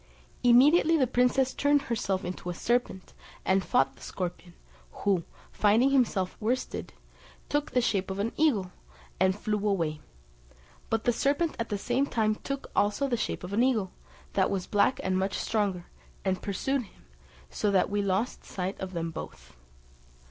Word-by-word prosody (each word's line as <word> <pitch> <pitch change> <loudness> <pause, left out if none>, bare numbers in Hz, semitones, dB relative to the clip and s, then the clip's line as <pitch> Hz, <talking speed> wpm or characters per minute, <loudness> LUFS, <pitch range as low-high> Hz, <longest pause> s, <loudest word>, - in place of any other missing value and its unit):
Immediately 295 +7 +6
the 270 - +3
princess 255 +1 +2
turned 285 0 +2
herself 195 -5 -1
into 180 0 -5
a 175 - -3
serpent, 235 -3 -1 0.3
and 190 0 +3
fought 135 -4 +2
the - - -20
scorpion, 180 -1 -6 0.4
who, 190 -5 0 0.3
finding 225 +6 +3
himself 220 -9 +1
worsted, 240 +4 -2 0.6
took 290 0 0
the 250 - +2
shape 195 -5 0
of 190 - -4
an 210 +3 -1
eagle, 220 -13 +2 0.5
and 190 +1 +3
flew 210 0 -1
away: 165 -6 0 0.9
but 225 0 0
the 240 - +2
serpent 290 +7 +1
at 230 - -2
the 205 - -1
same 250 +7 0
time 215 -4 +1
took 275 +5 -5
also 210 +7 +2
the 250 - 0
shape 225 - -3
of 180 +2 -6
an 220 - +3
eagle, 230 -7 +1 0.4
that 190 -1 +2
was 195 -2 -2
black 205 +5 +2
and 185 0 +1
much 195 +1 -1
stronger, 200 -5 -1 0.4
and 185 -1 0
pursued 265 +7 -1
him, 195 - -16 0.5
so 210 - 0
that 195 -1 +2
we 205 0 +1
lost 200 +4 -1
sight 190 +1 -4
of 190 0 -5
them 165 -1 -3
both. 160 - -9
205 Hz, 165 wpm, -28 LUFS, 190-250 Hz, 0.9 s, Immediately